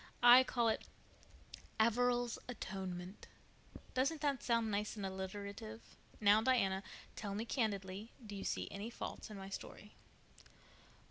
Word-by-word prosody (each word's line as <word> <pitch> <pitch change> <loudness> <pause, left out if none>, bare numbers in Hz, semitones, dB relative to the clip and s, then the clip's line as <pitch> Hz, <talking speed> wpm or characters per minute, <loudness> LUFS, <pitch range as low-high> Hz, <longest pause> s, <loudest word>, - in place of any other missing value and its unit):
I 245 +2 +10
call 240 -2 +1
it 220 - -1 0.9
Averil's 240 +1 +3
atonement. 190 -5 -5 0.7
Doesn't 275 +5 +1
that 285 -3 +1
sound 230 -2 +1
nice 210 +2 -1
and 205 -2 -4
alliterative? 190 - -6 0.2
Now, 210 +1 +6
Diana, 195 -6 +3 0.3
tell 200 -2 -4
me 220 +3 -2
candidly, 205 -3 -2
do 205 -1 -7
you 195 - -5
see - - -1
any 205 +3 -4
faults 235 - -6
in 210 - -7
my 195 0 -7
story?" 210 +1 -8
210 Hz, 130 wpm, -37 LUFS, 195-240 Hz, 0.9 s, I